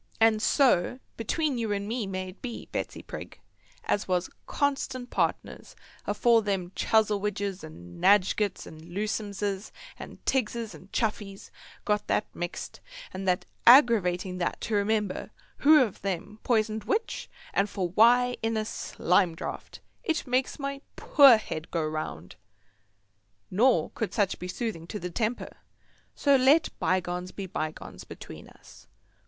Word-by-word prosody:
And 225 -1 +4
so, 250 - +3 0.2
between 275 +3 -1
you 225 -2 -2
and 200 0 -2
me 225 -2 -2
may 185 -1 -4
it 185 - -14
be, 240 -3 -6
Betsy - - -4
Prig, - - -9 0.4
as 205 - -1
was 180 -1 0 0.2
constant 270 -3 -1
partners - - -2 0.3
afore 235 -1 +4
them 195 -4 -2
Chuzzlewidges, 205 -3 0
and 85 - -11
Nadgetts, 205 0 +3
and 160 0 -12
Lewsomses, 205 +2 -3 0.3
and - - -9
Tiggses, 235 -3 -1
and 185 - -14
Chuffeys 210 -3 -3 0.3
got 210 -1 0
that - - +1
mixed 175 0 -6 0.3
and 190 +1 -5
that 180 -1 +1 0.2
aggerawating 195 -8 +5
that 175 - -1
to 230 - -3
remember 210 -1 0 0.3
who 300 -1 +6
of 215 -6 -5
them 195 +2 -4
poisoned 220 -3 0
which 440 +3 -2 0.3
or 195 - +3
for 190 -4 -3
why 245 +6 +4
in 225 0 0
a 215 - -1
slime 180 -4 +1
draught, - - -7 0.2
it 325 -8 -1
makes 255 0 0
my 275 -1 -4
poor 275 -6 +7
head 160 -7 -6
go 165 -2 -1
round, 155 - -5 1.1
nor 240 +7 +3
could 225 - -4
such 205 -4 +1
be 180 - -5
soothing 185 -4 -4
to 210 - -5
the 180 -3 -5
temper. 225 +5 -3 0.6
So 280 -1 +4
let 275 +5 +4
bygones 180 0 -1
be 195 - -6
bygones 155 -4 -5
between - - -11
us. - - -18
210 Hz, 140 wpm, -28 LUFS, 185-235 Hz, 1.1 s, poor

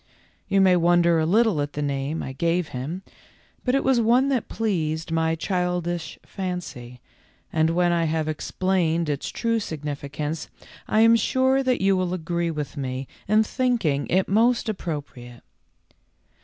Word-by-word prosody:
You 195 - +3
may 185 -1 +5
wonder 170 -1 +4
a 160 - +1
little 210 -4 +3
at 145 0 -4
the 150 - -3
name 140 +2 -2
I 130 - -6
gave 170 +3 0
him, 150 +9 -5 0.6
but 250 +1 +1
it 275 - +1
was 260 -3 +3
one 245 +5 +3
that 255 -5 -1
pleased 165 -7 -2
my 160 0 +1
childish 175 -1 -2
fancy, 170 -10 -6 0.5
and 160 0 +3
when 175 +1 +2
I 170 -1 +1
have 160 -1 -1
explained 170 +1 0
its 145 -1 -2
true 230 -1 0
sig 160 -8 -6
nificance 150 +1 -4 0.4
I 215 - +3
am 230 +1 +7
sure 260 +4 +2
that 255 -5 0
you 195 0 +3
will 185 -1 -1
agree 170 0 -2
with 150 -3 -4
me 130 -1 -4 0.2
in 215 +2 +4
thinking 220 - 0
it 190 +1 +2
most 230 +4 +2
appropriate. 145 - -6
170 Hz, 155 wpm, -24 LUFS, 155-205 Hz, 0.6 s, am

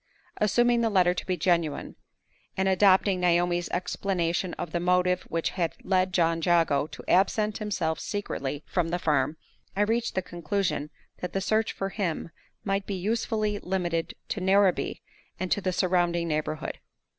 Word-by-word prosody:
Assuming 240 +3 +3
the 230 - +2
letter 180 -4 +4
to 180 - -5
be 185 -1 0
genuine, 170 -3 0 0.6
and 190 0 +1
adopting 190 0 +4
Naomi's 175 0 +2
explanation 180 -1 -1
of - - -5
the 175 - -1
motive 180 +1 +2
which 165 0 -1
had 170 -3 -1
led 185 -1 +2
John 165 -2 +2
Jago 165 -4 +3
to - - -10
absent 210 +3 +2
himself 190 -7 -1
secretly 145 -8 -4
from 175 -3 -1
the 175 - 0
farm, 150 -2 +1 0.4
I 200 - +1
reached 230 +3 0
the 185 - 0
conclusion 170 -3 -2 0.3
that 180 - -5
the 195 - 0
search 215 +3 +1
for 195 - -3
him 180 -5 -3 0.3
might 195 -1 -1
be 200 - -2
usefully 215 +1 -1
limited 175 -4 -2
to 200 - -3
Narrabee 190 0 +2 0.4
and 185 0 -3
to 205 - +2
the 185 - 0
surrounding 175 -2 +1
neighborhood. 155 0 -3
180 Hz, 155 wpm, -27 LUFS, 170-195 Hz, 0.6 s, letter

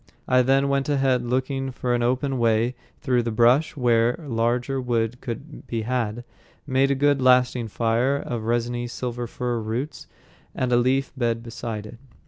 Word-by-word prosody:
I 130 0 +4
then 135 +2 +3
went 140 +1 0
ahead 135 -3 +2
looking 130 +2 -1
for 125 -1 -2
an 120 - +1
open 130 +2 0
way 115 +1 +2 0.3
through 125 -4 +2
the 120 - -2
bushes 120 +7 +3
to 145 - -11
where 120 0 +3
larger 125 -1 -1
wood 120 -1 -1
could 135 +5 -7
be 115 -2 -2
had, 120 -1 -2 0.4
made 135 +1 +2
a 140 - +2
good 145 0 +2
lasting 125 -2 +3
fire 115 +5 +1
of 120 -5 -4
resiny 120 +1 -1
silver 120 0 -4
fir 120 0 -2
roots, 115 +7 -4 0.5
and 125 -1 -1
a - - +5
leafy 130 +3 +1
bed 115 -3 -1
beside 115 -2 -5
it. 115 +2 -11
125 Hz, 170 wpm, -24 LUFS, 115-130 Hz, 0.5 s, a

